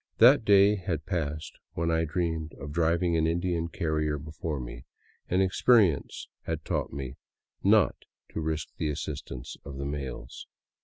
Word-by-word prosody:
That 125 +2 +7
day 100 0 +6
had 90 -5 -3
passed 80 -4 -3
when 85 0 0
I 80 0 +2
dreamed 80 -1 -2
of 75 - -7
driving 85 +2 +2
an 80 0 +2
Indian 85 0 0
carrier 75 -3 -1
before 75 0 -4
me, - - -8 0.4
and 95 +2 +3
experience 95 - +3 0.2
had - - -3
taught - - -1
me 70 -1 -6 0.5
not - - +5 0.4
to - - -2
risk 80 -1 -2
the 75 - -1
assistance 70 -4 -5
of 70 -1 -8
the 70 - -3
mails. 70 -4 -5
80 Hz, 150 wpm, -28 LUFS, 75-85 Hz, 0.5 s, That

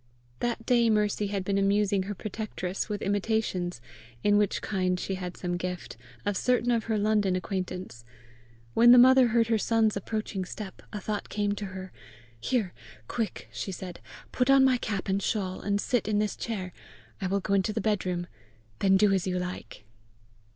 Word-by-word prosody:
That 235 -1 -2
day 235 -2 +4
Mercy 210 -1 +1
had 200 -1 -2
been 200 0 +1
amusing 200 -1 +2
her 205 - -3
protectress 205 -3 -4
with 210 -1 -3
imitations, 200 - -1 0.4
in 205 - +4
which 205 -1 +1
kind 185 -3 0
she 195 - -3
had 180 -1 -5
some 175 -1 -2
gift, 180 -9 -5 0.3
of 205 - 0
certain 245 +3 +2
of 230 -2 +1
her 225 -1 0
London 205 -2 +2
acquaintance: 185 - -4 0.7
when 240 +1 +8
the - - +8
mother 260 +1 +7
heard 230 0 +3
her 225 -1 +1
son's 220 -1 +2
approaching 205 -1 -3
step, 190 +1 -8
a 210 - -4
thought 205 0 -4
came 205 -1 0
to 205 0 -3
her. 190 -1 -7 0.5
"Here! 210 - -1 0.3
Quick!" 225 -3 -3
she 195 - -4
said; 180 -1 -7 0.3
"Put 250 +1 +1
on 275 -1 +7
my 260 -1 +4
cap 205 -5 -3
and 195 +1 +1
shawl, 190 -3 -2
and 200 0 0
sit 235 -1 0
in 215 -1 +1
this 210 0 0
chair. 190 -6 -4 0.5
I 190 - 0
will 200 +2 +1
go 200 - -2
into 195 +1 +2
the 215 - -2
bedroom. 185 -4 -1 0.5
Then 195 -1 +4
do 205 0 +4
as 190 -1 0
you 180 -1 0
like." 180 -10 -6
205 Hz, 180 wpm, -28 LUFS, 185-220 Hz, 0.7 s, when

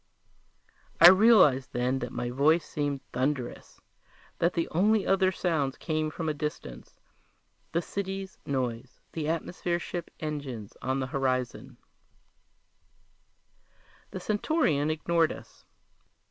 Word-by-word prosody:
I 170 - +11
realized 185 - +5
then 125 +2 0
that 125 -1 -5
my 120 0 -3
voice 155 +6 +3
seemed 145 -2 -3
thunderous, 130 0 -3 0.6
that 170 +1 +2
the 170 - -1
only 205 +5 +2
other 190 -1 +3
sounds 155 -8 -1
came 155 -1 -2
from 160 +1 -5
a 155 - +1
distance: 145 - -7 0.7
the 170 +1 0
city's 195 -1 -5
noise, 125 -2 -3
the 155 -2 -3
atmosphere 170 +1 -2
ships' 175 0 -6
engines 140 -9 -5
on 130 +1 -1
the - - -1
horizon 130 -3 -2 2.3
The 185 - -6
Centaurian 205 - +1
ignored 160 +1 +1
us. - - -12
155 Hz, 115 wpm, -28 LUFS, 130-175 Hz, 2.3 s, I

